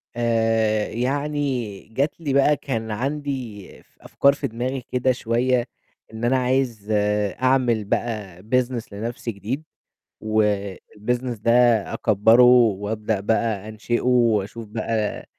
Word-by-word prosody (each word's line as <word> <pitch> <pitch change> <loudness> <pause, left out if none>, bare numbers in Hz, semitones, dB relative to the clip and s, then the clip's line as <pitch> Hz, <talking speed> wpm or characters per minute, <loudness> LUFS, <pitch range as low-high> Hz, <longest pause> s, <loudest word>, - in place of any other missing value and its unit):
آآ 115 -2 +1
يعني 130 -4 -2
جات 140 +5 0
لي 150 -5 -2
بقى 140 +1 +4
كان 115 -5 -4
عندي 130 -4 -4 0.2
ف - - -35
أفكار 140 0 +2
في 145 - -3
دماغي 125 +4 -3
كده 125 +1 0
شوية 120 +1 0 0.5
إن 110 - -7
أنا 125 +2 +3
عايز 125 -4 -1 0.5
أعمل 130 -4 +2
بقى 100 -5 -3
business 120 -1 -1
لنفْسي 115 +3 -4
جديد، 115 +8 -5 0.6
والbusiness 110 +3 -1
ده 115 - +2 0.4
أكبَّره 110 +3 +4
وابدأ 110 -3 +3
بقى 110 0 -1
أنشئه، 110 +2 -2
واشوف 115 -3 +1
بقى 110 0 -2
115 Hz, 115 wpm, -23 LUFS, 110-130 Hz, 0.6 s, بقى